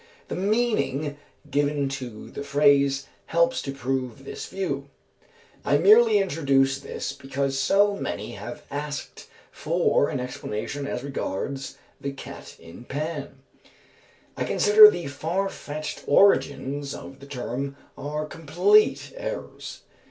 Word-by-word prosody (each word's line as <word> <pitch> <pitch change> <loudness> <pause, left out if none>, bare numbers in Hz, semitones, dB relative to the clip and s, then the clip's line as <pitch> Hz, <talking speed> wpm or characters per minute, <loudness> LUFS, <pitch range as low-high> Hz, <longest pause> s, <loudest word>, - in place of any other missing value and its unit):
The - - -3
meaning 180 - 0 0.4
given 145 0 +1
to 125 -5 -7
the 140 - -6
phrase 140 -1 +3 0.2
helps 170 0 +2
to 135 - -4
prove 130 -1 -3
this - - -6
view. 140 -8 -3 0.7
I 145 - +3
merely 215 +6 +6
introduce 140 -8 +2
this 140 - -5
because 135 0 -2
so 200 +8 +3
many - - -4
have - - -8
asked 145 0 -5 0.2
for 165 -2 +1
an 140 - -2
explanation 125 +2 -4
as 125 - -3
regards 135 0 -4 0.2
"the 140 0 -4
cat 135 - -10
in 85 +8 -12
pan." 145 -1 -5 0.9
I - - -2
consider 425 0 +8
the 175 - -4
"far 170 +7 -2
fetched" 155 -3 -6
origins 145 -5 +3
of 135 0 -10
the 140 - -12
term 135 0 -4 0.2
are 150 +2 -4
complete 175 +8 +2
errors. - - -6
140 Hz, 120 wpm, -25 LUFS, 135-170 Hz, 0.9 s, consider